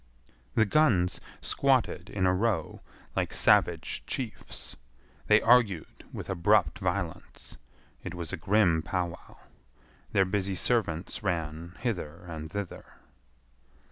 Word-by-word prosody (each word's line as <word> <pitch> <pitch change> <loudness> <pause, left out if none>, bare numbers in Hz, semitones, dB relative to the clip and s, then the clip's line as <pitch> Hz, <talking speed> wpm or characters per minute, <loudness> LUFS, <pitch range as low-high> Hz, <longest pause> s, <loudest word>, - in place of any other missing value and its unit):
The 110 - +5
guns 100 - +3 0.2
squatted - - +1
in 95 -2 -1
a 90 - +4
row 95 -5 -1 0.3
like - - -1
savage - - +3
chiefs. 120 -5 -5 0.5
They 105 0 +5
argued 115 -8 +3
with - - -7
abrupt 85 - +2
violence. - - -4 0.5
It 90 - -6
was 85 -3 -4
a - - -2
grim 90 -2 +3
pow 90 +1 -1
wow. 85 - -13 0.7
Their 95 - +4
busy 95 0 -1
servants 90 -4 0
ran 85 -3 -3
hither 90 -8 -3
and 80 -2 -7
thither. 100 -1 -5
95 Hz, 115 wpm, -29 LUFS, 85-105 Hz, 0.7 s, The